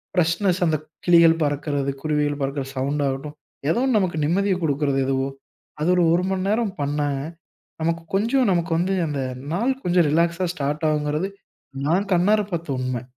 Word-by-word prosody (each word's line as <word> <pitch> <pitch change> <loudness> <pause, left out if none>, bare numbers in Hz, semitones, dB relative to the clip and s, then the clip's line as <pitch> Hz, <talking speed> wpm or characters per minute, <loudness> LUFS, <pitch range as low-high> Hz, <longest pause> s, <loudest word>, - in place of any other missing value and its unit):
freshness 175 +2 +1
அந்த 155 -1 +2 0.3
கிளிகள் 165 -1 +6
பறக்கிறது, 145 -1 -1
குருவிகள் 150 -1 0
பறக்கிற 135 0 -2
சவுண்டாகட்டும், 140 +2 -2 0.4
ஏதோ - - +1
ஒண்ணு 255 -4 +3
நமக்கு 175 -4 -1
நிம்மதிய 190 +4 +1
குடுக்கிறது 140 -2 +1
எதுவோ, 135 0 0 0.5
அது 165 - +1
ஒரு 175 - +3
1 185 +2 0
நேரம் 220 -1 +1
பண்னாங்க, 145 -1 -1 0.6
நமக்கு 165 +1 0
கொஞ்சம் 235 +4 +2
நமக்கு 170 -1 0
வந்து 185 +3 +1
அந்த 145 -2 -2 0.3
நாள் 230 +9 +1
கொஞ்சம் 175 -2 +3
ரிலாக்ஸா 170 +3 +1
ஸ்டார்ட் 150 0 -2
ஆகுங்கிறது, 150 +4 -1 0.6
நான் 185 +6 +2
கண்ணார 205 +5 +4
பார்த்த 160 -5 -2
உண்மை 130 -1 -2
160 Hz, 145 wpm, -23 LUFS, 145-180 Hz, 0.6 s, கிளிகள்